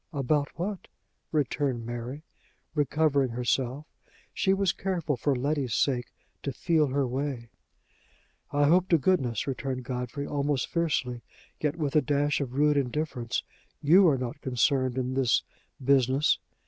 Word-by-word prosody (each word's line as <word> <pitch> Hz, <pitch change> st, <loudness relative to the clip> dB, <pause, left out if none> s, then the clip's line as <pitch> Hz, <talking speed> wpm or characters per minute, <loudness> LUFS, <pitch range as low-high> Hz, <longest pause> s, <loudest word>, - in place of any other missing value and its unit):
"About 145 Hz, +1 st, +1 dB
what?" 190 Hz, +3 st, -4 dB, 0.4 s
returned 140 Hz, -5 st, 0 dB
Mary, 120 Hz, +5 st, -5 dB, 0.5 s
recovering 145 Hz, -2 st, +2 dB
herself; 125 Hz, +4 st, -1 dB, 0.5 s
she 190 Hz, -, +1 dB
was 195 Hz, -1 st, +2 dB
careful, 175 Hz, -6 st, -1 dB
for 135 Hz, +3 st, 0 dB
Letty's 135 Hz, -2 st, -1 dB
sake, 125 Hz, -4 st, +1 dB, 0.3 s
to 140 Hz, -, -3 dB
feel 155 Hz, +3 st, +2 dB
her 135 Hz, +1 st, 0 dB
way. 130 Hz, -2 st, -3 dB, 1.0 s
"I 145 Hz, 0 st, +1 dB
hope 180 Hz, +5 st, +4 dB
to 170 Hz, -, +5 dB
goodness," 135 Hz, -, +1 dB
returned 130 Hz, -1 st, -3 dB
Godfrey, 125 Hz, +3 st, -4 dB
almost 145 Hz, -2 st, -1 dB
fiercely, 135 Hz, -8 st, -1 dB, 0.4 s
yet 150 Hz, 0 st, 0 dB
with 150 Hz, -4 st, -2 dB
a 150 Hz, -, +6 dB
dash 145 Hz, 0 st, +1 dB
of 130 Hz, -2 st, -4 dB
rude 150 Hz, +1 st, +3 dB
indifference, 130 Hz, -3 st, -2 dB, 0.4 s
"you 175 Hz, +6 st, +6 dB
are 145 Hz, -4 st, +4 dB
not 125 Hz, +2 st, -5 dB
concerned 130 Hz, 0 st, +1 dB
in 130 Hz, 0 st, -1 dB
this 130 Hz, -2 st, +2 dB, 0.4 s
business!" 135 Hz, +1 st, +3 dB
140 Hz, 135 wpm, -28 LUFS, 125-150 Hz, 1.0 s, a